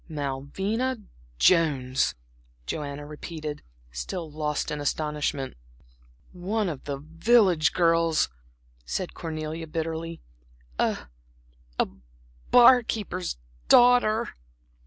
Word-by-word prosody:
"Malvina 160 - -2 0.4
Jones!" 135 - +3 0.5
Joanna 145 - -4
repeated, 150 0 -6 0.3
still 105 - -5
lost 150 0 -2
in 150 -1 -3
astonishment. 145 -2 -2 0.8
"One 195 +3 -1
of 145 -5 -7
the 140 -1 -3
village 165 - +3
girls!" 165 -2 +3 0.6
said 175 - -3
Cornelia, 160 0 -5
bitterly, 165 +1 -4 0.6
"a - - 0 0.7
a - - +2 0.6
bar 245 +1 +8
keeper's 185 - -3 0.3
daughter." 240 -2 +5
160 Hz, 85 wpm, -26 LUFS, 150-185 Hz, 0.8 s, bar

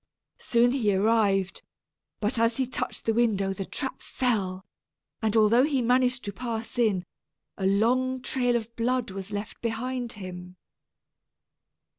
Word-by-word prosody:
Soon 240 0 +3
he 220 -7 +1
arrived; 200 -2 +2 0.6
but 225 +3 0
as 230 0 +2
he 265 - +1
touched 255 - -4
the 225 - +2
window 205 -4 +1
the 195 0 -5
trap 265 -2 -4
fell, 195 -7 -1 0.6
and 220 0 +1
although 220 +3 +5
he 285 -2 +1
managed 250 0 +2
to 200 - -4
pass 230 +1 -4
in, 200 -6 +2 0.5
a 190 - -1
long 250 +6 +2
trail 250 -1 0
of 230 0 -3
blood 245 -1 0
was 195 +1 -6
left 205 +2 -5
behind 240 +1 -3
him. 180 -2 -8
225 Hz, 140 wpm, -27 LUFS, 200-245 Hz, 0.6 s, although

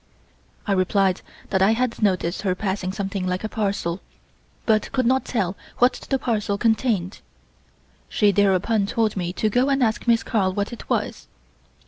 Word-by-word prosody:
I 205 - -1
replied 190 0 +2 0.3
that 190 - +2
I 200 +3 +5
had 245 0 -1
noticed 185 -4 +1
her 185 -3 0
passing 190 -2 -2
something 195 -1 -3
like 180 +2 -2
a - - -1
parcel, 195 -5 -2 0.6
but 215 -2 +2
could 255 -2 0
not 260 +2 +2
tell 200 -6 -1 0.2
what 245 +1 +4 0.2
the 270 - +2
parcel 210 -5 -1
contained. 220 -4 0 0.9
She 210 -2 +3
thereupon 200 +2 +2
told 220 -1 0
me 175 -2 -2
to 215 - 0
go 245 +6 +2
and 275 -1 +2
ask 220 +1 0
Miss 230 -1 +4
Carl 195 -5 0
what 200 +4 -2
it 235 - -10
was. - - -2
205 Hz, 165 wpm, -23 LUFS, 190-230 Hz, 0.9 s, I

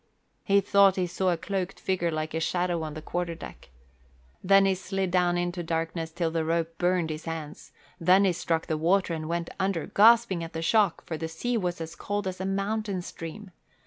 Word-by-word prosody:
He 200 0 +4
thought 200 -1 +5
he 185 - 0
saw 185 +2 -1
a 175 - +1
cloaked 190 +1 -3
figure 185 -3 0
like 155 -1 -3
a 160 - -1
shadow 175 0 0
on 155 -1 -5
the 155 - -7
quarter 175 0 -3
deck. 165 - -11 0.7
Then 195 +1 +6
he 195 - +3
slid 190 0 -3
down 175 -1 +2
into 175 0 -2
darkness 165 0 -3
till 165 0 -1
the 165 0 0
rope 165 0 -1
burned 175 -2 +1
his 155 0 -6
hands, 160 -2 -7 0.3
then 185 +4 +5
he 185 - +3
struck 165 -1 -1
the 155 -1 -2
water 180 +2 +2
and 155 -1 -4
went 170 0 -2
under, 190 -4 0
gasping 225 -4 +4
at 165 - -8
the 165 - -3
shock, 205 -1 +2
for 160 - -4
the 160 - -3
sea 200 +10 -2
was 180 -6 -1
as 165 0 -6
cold 205 0 -3
as 185 0 -4
a - - -2
mountain 200 -1 -2
stream. 180 +4 -8
175 Hz, 210 wpm, -27 LUFS, 165-195 Hz, 0.7 s, Then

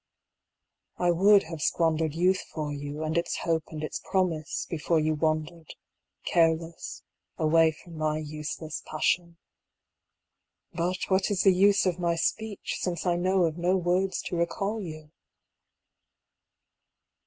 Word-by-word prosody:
I 175 -1 +2
would 195 +4 +5
have 160 -1 -7
squandered 160 -1 +1
Youth 185 +3 +2
for 150 -2 -3
you, 145 +2 -5
and 155 0 -2
its 170 - 0
hope 165 -2 0
and 155 -1 -7
its 155 - -4
promise, 170 -6 0
Before 165 0 0
you 155 0 +1
wandered, 155 +1 -2 0.5
careless, 165 0 0 0.3
away 160 0 +4
from 165 +1 -12
my 155 0 0
useless 155 0 -5
passion. 170 +2 0 1.4
But 175 +2 -1
what 190 +1 +2
is 200 -3 +1
the 195 - +6
use 200 +2 +4
of 180 -1 0
my 170 -1 +1
speech, 215 +4 -2
since 175 -2 -3
I 175 -1 +2
know 185 +1 +2
of 165 +1 -2
no 180 +2 +2
words 185 +2 0
to - - -4
recall 195 +6 -1
you? 155 -4 -8
170 Hz, 135 wpm, -27 LUFS, 155-180 Hz, 1.4 s, the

